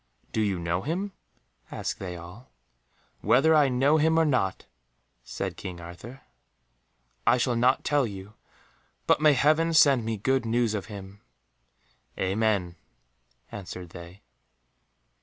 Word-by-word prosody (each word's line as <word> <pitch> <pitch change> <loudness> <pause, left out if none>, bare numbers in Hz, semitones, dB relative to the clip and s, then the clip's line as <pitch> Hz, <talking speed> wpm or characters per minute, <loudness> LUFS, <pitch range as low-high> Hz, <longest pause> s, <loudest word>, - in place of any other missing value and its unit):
"Do 110 - -1
you 100 -3 0
know 85 +1 -2
him?" 180 - -3 0.6
asked - - -4
they 90 -2 -6
all. 90 +9 -12 0.7
"Whether 160 +6 +4
I 150 -3 +5
know 135 +5 +3
him 160 +1 +2
or 165 - +4
not," 125 -11 0 0.6
said - - -5
King 90 -3 -7
Arthur, 90 +10 -11 1.1
"I - - +5
shall 125 0 0
not 125 +3 +2
tell 145 -3 +1
you, 100 0 -9 0.7
but - - +3
may 155 -1 +6
Heaven 155 +5 +2
send 140 -6 +5
me 110 0 -3
good 130 +5 +1
news 115 -1 0
of 100 -2 -4
him." 100 -1 -10 1.0
"Amen," 95 -3 0 0.7
answered 90 -3 -8
they. 85 +4 -12
115 Hz, 130 wpm, -27 LUFS, 95-140 Hz, 1.1 s, may